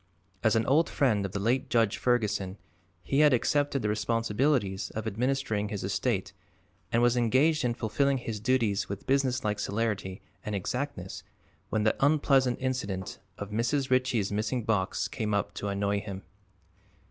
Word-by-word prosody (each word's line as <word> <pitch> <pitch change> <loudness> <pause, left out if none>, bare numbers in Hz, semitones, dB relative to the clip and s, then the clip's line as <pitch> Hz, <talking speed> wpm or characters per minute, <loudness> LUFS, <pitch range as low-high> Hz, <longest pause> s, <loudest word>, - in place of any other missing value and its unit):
As 110 -1 +4
an 115 - +2
old 155 +5 +3
friend 110 -9 +1
of - - -12
the 100 - -3
late 120 +6 0
Judge 115 -3 +2
Ferguson 105 -6 0 0.5
he 135 - 0
had 150 -2 +6
accepted 140 +1 +1
the 105 - +1
responsibilities 115 -1 0
of 110 0 -3
administering 110 -1 -1
his 105 -2 -4
estate - - -1 0.6
and 115 +1 +3
was 120 0 +4
engaged 130 +7 +3
in 120 -1 0
fulfilling 135 +5 +1
his 115 -4 -5
duties 115 -3 +1
with 100 0 -6
businesslike 130 -6 +1
celerity 105 -3 -2 0.2
and 105 - -3
exactness 100 -1 -4 0.5
when 110 -1 0
the 110 - +3
unpleasant 135 -4 +3
incident 105 -8 -3 0.2
of 100 0 -6
Mrs. 130 +5 0
Ritchie's 125 -6 +2
missing 110 +4 -1
box 105 -4 0
came 105 -4 -2
up 100 0 -1
to 100 - -4
annoy 100 0 0
him. 100 -2 -7
115 Hz, 155 wpm, -29 LUFS, 100-130 Hz, 0.6 s, had